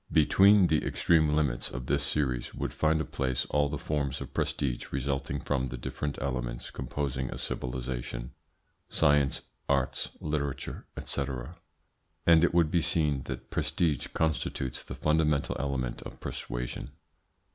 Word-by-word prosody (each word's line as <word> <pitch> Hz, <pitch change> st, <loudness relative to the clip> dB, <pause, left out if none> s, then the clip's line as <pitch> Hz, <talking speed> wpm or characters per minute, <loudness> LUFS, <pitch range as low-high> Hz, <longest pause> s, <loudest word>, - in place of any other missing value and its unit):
Between 95 Hz, +6 st, +6 dB
the 80 Hz, -3 st, +2 dB
extreme 80 Hz, -3 st, +3 dB
limits 75 Hz, -5 st, +1 dB
of 60 Hz, +1 st, -5 dB
this -, -, +1 dB
series 65 Hz, -5 st, -1 dB
would -, -, -3 dB
find 80 Hz, 0 st, +2 dB
a 80 Hz, -, -1 dB
place 65 Hz, -1 st, -1 dB
all 75 Hz, 0 st, +3 dB
the 75 Hz, -, -2 dB
forms 70 Hz, -2 st, -1 dB
of -, -, -7 dB
prestige 65 Hz, -4 st, -1 dB
resulting 70 Hz, +1 st, -1 dB
from 65 Hz, -2 st, 0 dB
the 60 Hz, 0 st, -5 dB
different 70 Hz, +3 st, -3 dB
elements 60 Hz, -3 st, -3 dB
composing 65 Hz, -3 st, -2 dB
a -, -, -5 dB
civilisation 60 Hz, -1 st, -4 dB, 0.6 s
sciences, 70 Hz, -1 st, +3 dB, 0.3 s
arts, -, -, +1 dB
literature, 70 Hz, -3 st, -3 dB, 0.2 s
&c. -, -, -1 dB, 1.0 s
and 85 Hz, -1 st, +7 dB
it 85 Hz, -, +5 dB
would 85 Hz, -2 st, +3 dB
be 85 Hz, -, +3 dB
seen 75 Hz, -4 st, +1 dB
that -, -, -6 dB
prestige 75 Hz, -2 st, +1 dB
constitutes 75 Hz, -5 st, -1 dB
the -, -, -7 dB
fundamental 75 Hz, -2 st, +2 dB
element 65 Hz, -3 st, -2 dB
of -, -, -9 dB
persuasion. -, -, -4 dB
70 Hz, 140 wpm, -30 LUFS, 65-75 Hz, 1.0 s, and